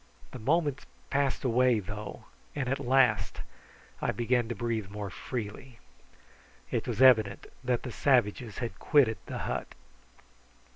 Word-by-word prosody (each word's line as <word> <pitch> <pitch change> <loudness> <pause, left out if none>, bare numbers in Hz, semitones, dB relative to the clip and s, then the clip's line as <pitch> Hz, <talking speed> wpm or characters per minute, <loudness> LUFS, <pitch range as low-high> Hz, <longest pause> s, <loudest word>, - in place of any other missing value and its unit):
The 130 - -8
moments 145 +3 0 0.2
passed 140 -2 +1
away, 125 -2 +3
though, 105 +1 -7 0.3
and 140 -3 -2
at 135 +2 0
last 135 -1 +2 0.6
I - - +1
began 120 0 +1
to 120 - -4
breathe 115 -4 -2
more 100 -1 -5
freely. 120 +3 -6 0.9
It - - -1
was 130 - +1
evident 110 -6 +5 0.2
that 125 -1 0
the 125 - -5
savages 120 -4 +1
had 120 -2 -4
quitted 130 -8 +4
the - - -4
hut. - - -4
120 Hz, 135 wpm, -29 LUFS, 110-130 Hz, 0.9 s, evident